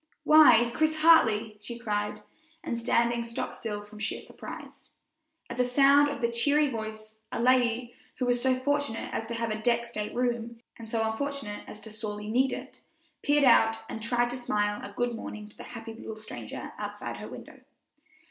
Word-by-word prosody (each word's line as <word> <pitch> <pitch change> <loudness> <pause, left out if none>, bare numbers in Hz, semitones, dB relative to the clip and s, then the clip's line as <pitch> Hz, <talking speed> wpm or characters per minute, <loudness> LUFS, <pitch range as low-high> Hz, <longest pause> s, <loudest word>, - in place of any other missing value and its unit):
"Why, 240 -7 +7
Chris 315 0 +2
Hartley!" 225 -10 +5
she 235 +3 -7
cried, 210 -3 -2 0.4
and 235 - -3
standing 235 0 +2
stock 230 0 -4
still 210 -3 -5
from 210 +1 -13
sheer 215 - -3
surprise. - - -10 0.6
At - - -7
the 250 - +3
sound 280 +3 +5
of 285 - -5
the 235 0 +1
cheery 285 +5 +3
voice, 220 -1 -7
a - - -3
lady, 245 -1 +2 0.2
who 255 - -2
was 245 0 +2
so 260 0 +2
fortunate 285 -3 -1
as 225 - -3
to 235 - -4
have 230 -1 -2
a 215 0 -3
deck 235 +1 +2
state 215 -2 -5
room, 235 -1 -1 0.2
and 225 -1 -11
so 225 -1 0
unfortunate 220 -1 -3
as 210 - -9
to 220 - -10
sorely 210 -1 -6
need 260 +3 +3
it, - - -7 0.4
peered 290 0 +3
out 225 -3 +5
and 220 - -6
tried 240 +1 +1
to 250 - -4
smile 210 -4 -1
a 200 - -7
good 245 +3 -1
morning 215 -2 -7
to - - -17
the - - -11
happy 225 -1 -8
little 225 -1 -8
stranger 215 0 -8
outside - - -5
her - - -7
window. - - -11
235 Hz, 185 wpm, -28 LUFS, 220-250 Hz, 0.6 s, Why